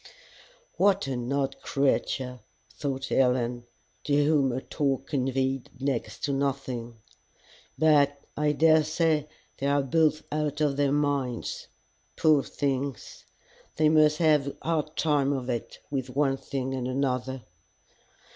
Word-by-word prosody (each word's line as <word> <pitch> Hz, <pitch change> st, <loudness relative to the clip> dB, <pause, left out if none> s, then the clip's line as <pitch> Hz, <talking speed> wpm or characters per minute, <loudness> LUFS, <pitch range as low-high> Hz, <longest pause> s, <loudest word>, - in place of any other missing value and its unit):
"What 195 Hz, -2 st, +3 dB
an 125 Hz, -2 st, -3 dB
odd 135 Hz, -1 st, -1 dB
creature!" 130 Hz, -2 st, 0 dB, 0.3 s
thought 135 Hz, -1 st, -4 dB
Helen, 125 Hz, -2 st, +1 dB, 0.4 s
to 145 Hz, -, 0 dB
whom 145 Hz, -3 st, +3 dB
her 125 Hz, +1 st, -2 dB
talk 135 Hz, -2 st, -1 dB
conveyed 135 Hz, -1 st, -1 dB
next 120 Hz, -6 st, -3 dB
to 145 Hz, -, 0 dB
nothing. 130 Hz, -4 st, -3 dB, 0.4 s
" -, -, -30 dB, 0.3 s
But 145 Hz, -2 st, +4 dB, 0.2 s
I 150 Hz, 0 st, +1 dB
daresay 155 Hz, 0 st, +3 dB, 0.3 s
they 140 Hz, -, -1 dB
are 140 Hz, 0 st, +2 dB
both 155 Hz, +3 st, +2 dB
out 150 Hz, -1 st, -1 dB
of 150 Hz, -2 st, +1 dB
their 140 Hz, -1 st, +2 dB
minds. 140 Hz, -4 st, -1 dB, 0.5 s
Poor 155 Hz, -3 st, +4 dB
things! 135 Hz, -2 st, -3 dB, 0.5 s
they 155 Hz, -1 st, +4 dB
must 155 Hz, -1 st, +4 dB
have 150 Hz, -4 st, +3 dB
a 140 Hz, -, -5 dB
hard 155 Hz, -2 st, -1 dB
time 145 Hz, -3 st, +2 dB
of 130 Hz, -2 st, -3 dB
it 120 Hz, -2 st, -4 dB
with 130 Hz, -2 st, -2 dB
one 135 Hz, +1 st, +1 dB
thing 135 Hz, -1 st, -4 dB
and 130 Hz, -1 st, -2 dB
another!" 130 Hz, -1 st, -2 dB
140 Hz, 130 wpm, -27 LUFS, 130-150 Hz, 0.5 s, But